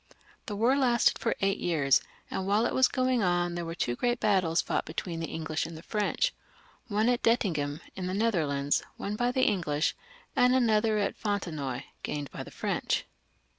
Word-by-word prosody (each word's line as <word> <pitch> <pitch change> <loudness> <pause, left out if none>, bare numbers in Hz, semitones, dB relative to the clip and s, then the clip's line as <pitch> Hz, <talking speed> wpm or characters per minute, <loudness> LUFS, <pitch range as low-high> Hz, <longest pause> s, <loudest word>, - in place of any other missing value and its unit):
The 210 - -3
war 235 +6 +3
lasted 245 -4 +3
for - - 0
eight 195 0 +1
yeaxs, 145 -6 +3 0.3
and 190 - -2
whUe 210 +4 +3
it - - -3
was 260 - +5
going 255 -2 +1
on 175 -2 +1
there 175 0 -3
were 165 0 -5
two 120 -7 -1
great 240 - 0
battles 185 -6 +2
fought - - 0
between 165 +1 -4
the 165 - -3
English 155 -1 -2
and 165 -1 -8
the 160 - -11
French 215 - 0 0.3
— - - -28
one 215 0 +1
at 245 -1 +2
Dettingen, 160 -10 +1
in 185 -1 -4
the 185 - -2
Netherlands, 155 -10 +1 0.2
won 205 - -3
by 245 +3 +1
the 255 +1 +1
English, 155 -6 +1 0.4
and 250 +1 +5
another 220 -3 +3
at 200 -1 0
Fontenoy, 155 - -3 0.2
gained 145 -1 -4
by - - -6
the - - -8
French. - - -1
195 Hz, 190 wpm, -29 LUFS, 160-230 Hz, 0.4 s, was